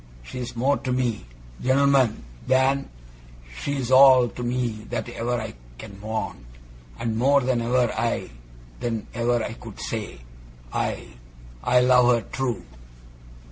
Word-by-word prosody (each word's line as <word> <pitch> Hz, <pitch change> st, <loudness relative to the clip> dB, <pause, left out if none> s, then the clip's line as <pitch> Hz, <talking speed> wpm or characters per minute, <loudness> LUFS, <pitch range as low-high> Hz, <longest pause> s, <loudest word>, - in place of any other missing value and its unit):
She's 125 Hz, -, -6 dB
more 135 Hz, +4 st, +2 dB
to 130 Hz, -, -4 dB
me 125 Hz, -, -1 dB, 0.4 s
gent'lmen 130 Hz, -3 st, +3 dB, 0.2 s
than 130 Hz, +1 st, +2 dB, 0.7 s
she's 135 Hz, -3 st, -2 dB
all 130 Hz, -2 st, +7 dB
to 125 Hz, -, -8 dB
me 120 Hz, -3 st, -2 dB
that -, -, -3 dB
ever 120 Hz, 0 st, -2 dB
I -, -, -6 dB, 0.2 s
can 100 Hz, +10 st, -10 dB
want, 110 Hz, -10 st, -4 dB, 0.5 s
and 115 Hz, -1 st, -2 dB
more 140 Hz, +3 st, +4 dB
than 125 Hz, -2 st, 0 dB
ever 120 Hz, 0 st, +1 dB
I 110 Hz, -, -2 dB, 0.5 s
than 115 Hz, -2 st, -3 dB
ever 120 Hz, -1 st, +1 dB
I -, -, -4 dB
could 115 Hz, -3 st, -11 dB
say. 110 Hz, -, -4 dB, 0.6 s
I -, -, -2 dB, 0.6 s
I 125 Hz, 0 st, +4 dB
love 125 Hz, -1 st, +5 dB
her 115 Hz, -, -1 dB
true. 130 Hz, -4 st, -2 dB
120 Hz, 135 wpm, -24 LUFS, 115-130 Hz, 0.7 s, all